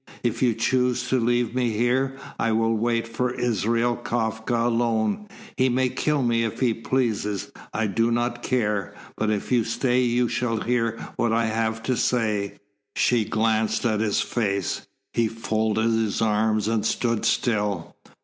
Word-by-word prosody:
If 120 -3 -1
you 120 -4 +3
choose 125 +1 +1
to 130 - +2
leave 120 0 +1
me 125 -3 0
here, 130 +4 +1 0.2
I 115 - +1
will 115 +1 +2
wait 115 +1 0
for 120 +2 -2
Israel 120 +1 +1
Kafka 115 -1 -1
alone. 120 - 0 0.3
He 130 0 +3
may 130 +1 +2
kill 150 +1 0
me 115 -1 +2
if 115 - -3
he 125 -3 +2
pleases. 110 -5 -1 0.2
I 110 - 0
do 115 +3 +1
not 120 +1 -1
care. 105 -7 -1 0.2
But 110 - -1
if 105 +2 -2
you 120 -2 +4
stay 125 +3 +1
you 120 0 +2
shall 120 -1 -1
hear 115 -2 0 0.2
what 120 - +1
I 115 0 +2
have 110 0 -1
to 130 - 0
say." 110 -4 0 0.4
She 120 -3 +2
glanced 110 +2 +1
at 110 -3 +2
his 105 -2 +1
face. 100 -5 -1 0.3
He 115 -1 +2
folded 110 0 0
his 110 -2 0
arms 110 -1 +1
and 110 -2 +1
stood 115 0 0
still. 105 -6 0
115 Hz, 160 wpm, -24 LUFS, 110-120 Hz, 0.4 s, you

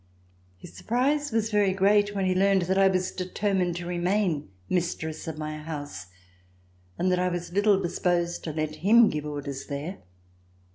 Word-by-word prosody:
His - - -13
surprise 280 +5 0
was 225 0 0
very 205 -2 +3
great 205 +1 +3
when 195 -1 0
he 185 - +2
learned 195 0 +3
that 190 +2 0
I 195 - +6
was 185 -1 0
determined 185 -1 -1
to 175 0 -5
remain 175 - 0 0.2
mistress 165 -3 -2
of 160 -1 -5
my 155 0 -5
house 145 - -7 0.9
and 185 +1 +1
that 180 - +2
I 180 - +1
was 175 -1 -5
little 205 0 +4
disposed 175 -1 -1
to 160 - -2
let 155 0 -3
him 225 +5 +5
give 150 0 -4
orders 140 -2 -5
there. 150 +7 -5
180 Hz, 165 wpm, -26 LUFS, 160-200 Hz, 0.9 s, I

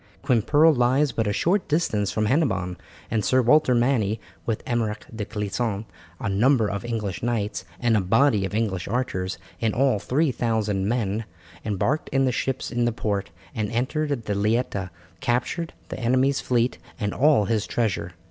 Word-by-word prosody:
Quimperle 145 +5 +4
lies 130 +3 +2
but 115 -2 -1
a - - +1
short 180 - +1
distance 110 - +1
from 110 - 0
Hennebon, 105 - +1 0.4
and 110 -2 +1
Sir 130 - +3
Walter 130 0 +4
Manny 120 -4 +2 0.3
with 115 -2 -2
Almeric 115 -3 -1
de 105 -2 -3
Clisson, 105 0 -2 0.3
a - - -3
number 110 +4 +3
of 100 +2 -4
English 110 -6 -3
knights, 105 -6 -2
and 120 -2 +2
a 105 - +3
body 115 +3 +3
of 95 +2 -3
English 100 -5 -1
archers, 95 -6 -2 0.2
in 110 -2 0
all 130 -4 +3
three 140 +8 +1
thousand 110 -5 0
men, 110 -2 -1 0.4
embarked 110 +9 -1
in 135 0 +2
the 130 - +2
ships 130 +3 -2
in 120 -1 +1
the 120 - +2
port, 100 -4 -2 0.2
and 110 -1 -2
entering 145 +6 -1
the 105 -2 -3
Leita 100 -2 0 0.3
captured 125 - -1 0.2
the - - -5
enemy's 130 +3 +2
fleet 120 0 +1 0.2
and 100 -2 -1
all 140 -6 +4
his 110 0 0
treasure. 100 -6 -1
115 Hz, 165 wpm, -24 LUFS, 105-130 Hz, 0.4 s, Quimperle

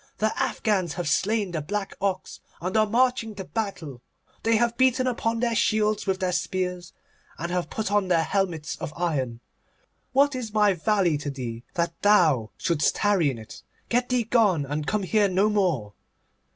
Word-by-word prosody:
The 215 0 0
Afghans 190 -7 0
have 175 -3 -4
slain 205 +4 +1
the 160 -3 -2
black 200 +6 -3
ox, 195 -2 -2 0.2
and 185 +3 -4
are 215 0 +4
marching 235 -1 +1
to 195 - -6
battle. 180 - -4 0.4
They 230 0 +2
have 235 +1 +2
beaten 260 0 +3
upon 230 -2 -1
their 240 -1 +1
shields 215 -1 +1
with 190 -1 0
their 185 -1 +1
spears, 180 0 -2 0.5
and 170 +1 -4
have 180 -1 -1
put 215 -2 -3
on 205 -2 +2
their 170 -3 +3
helmets 175 -5 -1
of - - -5
iron. 135 -9 -2 0.7
What 280 +2 +3
is 230 -4 -5
my 210 -2 +4
valley 180 -4 +1
to 145 - -4
thee, 120 -4 -6
that 170 0 0
thou 160 - +4
shouldst 170 -5 +1
tarry 200 -7 +2
in 130 - -4
it? 110 -1 -11 0.3
Get 245 +1 +1
thee 250 -1 +2
gone, 210 -10 +2
and 145 +2 -3
come 210 -1 0
here 205 +2 +2
no 190 +3 +2
more. 170 - 0
195 Hz, 180 wpm, -25 LUFS, 165-220 Hz, 0.7 s, are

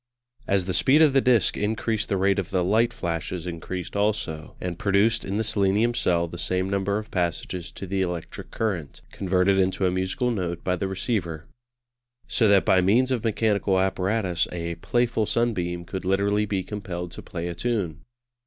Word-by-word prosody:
As 100 -2 +2
the 95 - -2
speed 135 +10 +5
of 150 -3 +4
the 135 - +5
disc 120 -7 +3
increased 110 +1 -1
the 100 - +1
rate 100 +1 +2
of 95 - -4
the 90 -2 +1
light 110 +6 +3
flashes 85 -4 -4
increased 90 +1 -5
also, 100 -6 -1
and 90 -2 -4
produced 105 +3 +2
in 100 +1 -3
the 110 - +1
selenium 105 +2 +2
cell 85 -6 +1
the 85 +1 -8
same 95 +1 0
number 100 +1 0
of 110 0 -7
passages 90 0 -2
to - - -7
the 95 +1 -1
electric 90 -3 -4
current, 90 -10 -3
converted 95 0 +2
into 95 0 +1
a 90 - +2
musical 95 +7 -1
note 85 -6 -3
by 90 - +1
the 95 +2 -2
receiver. 90 -5 -2 0.8
So 115 - +2
that 100 -2 +5
by 95 - +4
means 120 +8 +3
of 125 -4 0
mechanical 105 -4 +1
apparatus 95 -1 0
a 85 -1 -3
"playful 120 +4 0
sunbeam" 90 -7 -1
could 95 +2 -5
literally 100 +2 +1
be 95 -2 -1
compelled 90 -3 -5
to - - -8
play 85 -1 -5
a 85 - -3
tune. 90 -6 -2
95 Hz, 180 wpm, -25 LUFS, 90-105 Hz, 0.8 s, speed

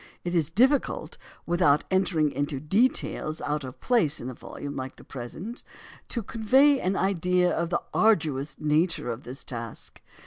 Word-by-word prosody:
It 175 - -3
is 165 -4 +1
difficult, 255 - +1 0.3
without 160 -4 +3
entering 180 -6 +2
into 145 0 -2
details 160 - 0
out 150 0 -2
of 130 -1 -8
place 210 - +2
in 125 - -5
a - - -8
volume 140 +3 -8
like 130 0 -5
the - - -15
present, 160 - -7 0.5
to 235 - -2
convey 265 +7 +4
an 190 -3 0
idea 180 -2 +2
of 170 0 -1
the 175 - -1
arduous 150 -10 +2
nature 155 -2 +1
of 115 +3 -7
this 130 +2 -8
task. 115 -3 -7
165 Hz, 160 wpm, -27 LUFS, 140-195 Hz, 0.5 s, convey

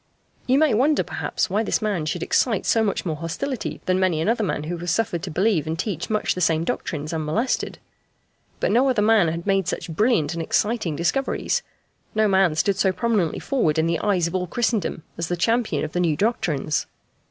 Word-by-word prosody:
You 260 +1 +4
may 305 -3 +4
wonder, 280 +7 +3
perhaps, - - -2
why 205 +3 0
this 225 - 0
man 200 -8 -1
should 170 +2 -2
excite 225 -7 +1
so 225 - +3
much 200 -3 -1
more 160 -3 -2
hostility 210 - -4
than 185 0 +1
many 185 -4 +2
another 220 +7 +1
man 165 -6 -2
who 170 +3 -3
was 175 +1 -5
suffered 175 -2 0
to 190 - -5
believe 175 -1 +1
and 160 +1 -2
teach 175 -3 -3
much 215 -1 +1
the 180 - -5
same 160 -1 +2
doctrines 155 -2 -3
unmolested. 160 +11 -1 0.8
But - - +1
no 250 +5 +4
other 230 -5 +2
man 215 -4 +4
had 165 +1 -3
made 195 -3 +1
such 175 - -3
brilliant 190 - +2
and 170 - -3
exciting 205 -1 0
discoveries. 270 - 0 0.5
No 215 0 +3
man 190 -5 +3
stood 190 +4 +1
so 195 -1 +3
prominently 205 -6 0
forward 170 - 0
in 160 - +2
the 165 0 0
eyes 195 -5 +1
of 170 - -3
all 180 -1 -1
Christendom 225 -6 -1 0.2
as 165 - -1
the 175 - -2
champion 230 +6 +1
of 155 - -7
the 180 - -2
new 165 -4 +1
doctrines. 160 - 0
185 Hz, 205 wpm, -23 LUFS, 165-220 Hz, 0.8 s, You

